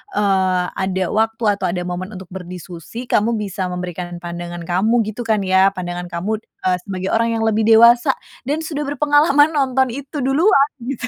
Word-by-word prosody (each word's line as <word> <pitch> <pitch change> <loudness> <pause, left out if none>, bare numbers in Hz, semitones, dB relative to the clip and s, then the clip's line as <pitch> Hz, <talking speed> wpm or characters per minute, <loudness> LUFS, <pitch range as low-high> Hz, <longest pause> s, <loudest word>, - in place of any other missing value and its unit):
eee, 190 -3 +2
ada 190 -1 -1
waktu 225 +1 0
atau 200 - -2
ada 180 0 -2
momen 180 +3 -5
untuk 185 -1 -10
berdiskusi, 180 +3 -8
kamu 230 -1 +1
bisa 195 -3 -3
memberikan 180 -1 -5
pandangan 175 0 -6
kamu 215 +8 +1
gitu 230 +2 -7
kan 215 -3 +1
ya 190 +1 +3
pandangan 175 -1 -5
kamu, 190 +6 -3
eee, 185 -4 -3
sebagai 190 -1 -3
orang 230 0 +1
yang 225 - -1
lebih 220 0 +1
dewasa 235 +4 +6 0.3
dan 305 +3 -1
sudah 295 -2 -4
berpengalaman 290 +1 +3
nonton 265 -4 +1
itu 280 +2 -5
duluan 275 +1 +3 0.2
gitu. 255 -2 -3
210 Hz, 170 wpm, -19 LUFS, 180-250 Hz, 0.3 s, dewasa